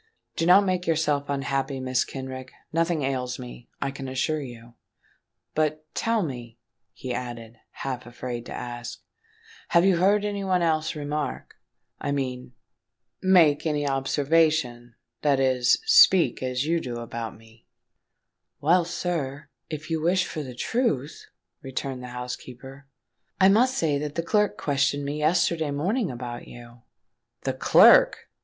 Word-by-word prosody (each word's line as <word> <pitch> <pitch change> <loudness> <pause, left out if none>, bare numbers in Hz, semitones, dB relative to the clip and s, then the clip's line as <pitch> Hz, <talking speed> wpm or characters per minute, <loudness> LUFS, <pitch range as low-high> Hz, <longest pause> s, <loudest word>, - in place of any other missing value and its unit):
"Do 165 - 0
not 195 +3 +7
make 185 -2 -1
yourself 150 -3 +1
unhappy, 135 -1 -2
Mrs. 130 0 0
Kenrick: 130 -1 -7 0.2
nothing 165 -2 +1
ails 130 -2 -2
me, 125 -1 -10
I 135 - -2
can 135 0 -7
assure 140 +4 -1
you. 120 -3 -10 0.8
But—tell 155 +8 -1
me," 120 -6 -7 0.3
he 125 -1 -6
added, 120 -2 -6
half 130 -2 -6
afraid 120 0 -6
to - - -9
ask 120 -1 -6
the - - -36
question; - - -54 0.6
"have 170 +1 +4
you 190 -3 +4
heard 200 +4 +3
any 200 -1 -3
one 185 -2 +1
else 160 -1 0
remark—I 145 -1 -6
mean, 125 -2 -4 0.7
make 170 -6 +4
any 145 -2 0
observation—that 135 -3 0
is, 130 -2 +3
speak 445 - +6
as 130 +1 -1
you 165 +2 +1
do 120 -6 -5
about 115 -2 -6
me——" 110 0 -21 0.9
"Well, 170 +4 +3
sir, 165 -5 -3 0.2
if 155 +1 -6
you 160 -1 0
wish 180 +3 +2
for 155 - -5
the 130 -4 -8
truth," 155 - -2 0.3
returned 135 -1 -5
the 125 - -7
housekeeper, 125 +2 -8 0.5
"I 190 0 +6
must 250 +6 +3
say 150 -3 +1
that 150 0 -5
the 165 - -1
clerk 210 +4 +1
questioned 140 0 0
me 145 +2 -3
yesterday 160 0 +1
morning 180 - -1
about 120 -1 -7
you." 120 0 -13 0.6
"The - - -1
clerk!" - - +5
140 Hz, 140 wpm, -25 LUFS, 125-165 Hz, 0.9 s, not